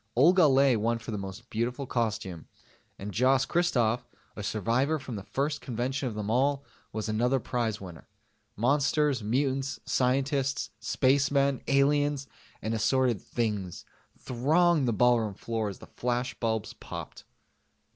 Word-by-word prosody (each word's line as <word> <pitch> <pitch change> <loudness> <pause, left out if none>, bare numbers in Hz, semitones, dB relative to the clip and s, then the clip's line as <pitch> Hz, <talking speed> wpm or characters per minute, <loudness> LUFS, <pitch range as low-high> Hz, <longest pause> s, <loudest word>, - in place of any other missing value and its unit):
Olga 165 +6 +6
Ley 135 -2 +4
won 115 +2 0
for 115 0 -8
the 105 - -2
Most 95 +5 -8
Beautiful 125 +5 -2
costume, 110 -9 -2 0.5
and 100 +1 -6
Jos 130 +2 +3
Christoff 125 -9 +1 0.3
a - - -6
survivor 115 - 0
from 130 -4 -7
the 100 - -5
first 140 +8 -2
convention 130 +2 -2
of 110 - -7
them 105 -1 -4
all 140 +3 +2 0.3
was 110 0 -4
another 120 +5 +1
prize 115 -3 -2
winner. 90 -4 -10 0.5
Monsters, 140 +3 +2
mutants, 135 +5 -1
scientists, 135 +2 0
spacemen, 140 0 +2
aliens, 145 0 +2 0.4
and 110 - -1
assorted 115 0 +2
"Things" 105 -6 -3 0.3
thronged 150 +4 +2
the - - +2
ballroom 115 -2 +2
floor 110 0 -2
as 95 - -8
the - - -12
flashbulbs 120 -3 -2
popped. - - -8
125 Hz, 135 wpm, -28 LUFS, 110-140 Hz, 0.5 s, Olga